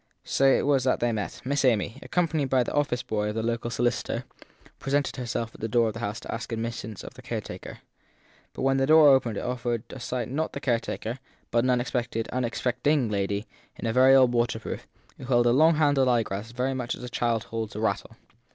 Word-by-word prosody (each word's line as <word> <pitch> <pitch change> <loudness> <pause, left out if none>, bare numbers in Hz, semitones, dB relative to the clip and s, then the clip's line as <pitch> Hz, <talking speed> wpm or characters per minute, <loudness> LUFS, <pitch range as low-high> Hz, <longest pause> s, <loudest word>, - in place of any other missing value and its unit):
So 135 - +1
it 135 - +4
was 140 -2 +3
that 130 - +2
they 120 0 +1
met: 105 -3 -4
Miss 140 +2 0
Amy, 115 -1 +1
accompanied 160 -6 0
by 130 -1 +3
the - - -5
office 145 -4 0
boy 105 -1 -1
of 105 - -4
the 110 - -1
local 115 0 -1
solicitor, 120 0 -1 0.6
presented 140 +1 -1
herself 120 -2 -3
at - - -14
the 110 - -1
door 115 0 +2
of - - -5
the 115 - -7
house 110 -2 -3
to - - -6
ask 115 +1 -5
admittance 115 -2 -4
of - - -9
the - - -13
caretaker. - - -6 0.7
But - - -5
when 135 0 +3
the 135 0 +2
door 155 -1 +8
opened 125 -6 +3
it - - -2
offered 120 -2 -2
to 130 - -8
sight 120 -1 -3
not 155 +5 -2
the - - -4
caretaker, 120 -2 -2 0.3
but 120 0 +3
an - - +2
unexpected, 120 -2 -1
unexpect 125 +1 -1
ing 140 -7 +3
lady 100 +1 -1 0.3
in - - -7
a 115 - 0
very 130 +2 +6
old 130 -2 +5
waterproof, 120 - -2 0.3
who - - -8
held 120 -1 +3
a 120 - +5
long 160 +6 +5
handled 145 -4 +3
eyeglass 110 -3 0
very 125 +2 -1
much 125 -2 -3
as - - -11
a - - -5
child 120 -2 0
holds 115 -2 -5
a - - -4
rattle. 110 +1 -2
120 Hz, 220 wpm, -26 LUFS, 115-135 Hz, 0.7 s, door